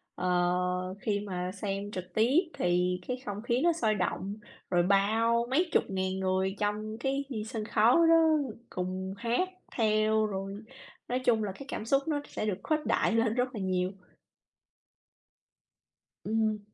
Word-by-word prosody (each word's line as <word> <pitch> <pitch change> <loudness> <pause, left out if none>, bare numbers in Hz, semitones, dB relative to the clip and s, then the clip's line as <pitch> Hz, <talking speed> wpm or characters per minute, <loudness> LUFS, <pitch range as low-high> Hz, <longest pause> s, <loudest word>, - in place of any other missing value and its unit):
ờ, 180 +1 0
khi 205 -2 0
mà 185 -3 -4
xem 200 +1 -4
trực 185 -2 -7
tiếp 240 +8 +4 0.2
thì 180 +1 +1
cái 250 - -2
không 205 0 -4
khí 240 +2 0
nó 345 0 +4
sôi 225 -10 +1
động, 195 +1 -2 0.4
rồi 175 -1 +3
bao 220 +5 +3
mấy 335 +7 +2
chục - - +4
ngàn 190 0 -1
người 190 +1 0
trong 215 +1 -2
cái 270 +3 -1 0.2
sân 220 -1 -4
khấu 225 +3 +4
đó 330 - +7 0.5
cùng 185 +1 -3
hát 240 - 0 0.3
theo, 215 -1 +3
rồi 195 -1 -4 0.5
nói 250 +1 0
chung 235 -4 +2
là 200 - -2
cái 270 +9 -10
cảm 220 - -4
xúc 275 +4 +3
nó 295 -2 0
sẽ - - -4
được 205 -4 -1
khuếch 310 -1 0
đại - - +2
lên 225 -1 +2
rất 250 0 -1
là 205 - -4
nhiều. 185 -1 0 2.3
Ừm. 215 0 0
210 Hz, 160 wpm, -30 LUFS, 185-235 Hz, 2.3 s, đó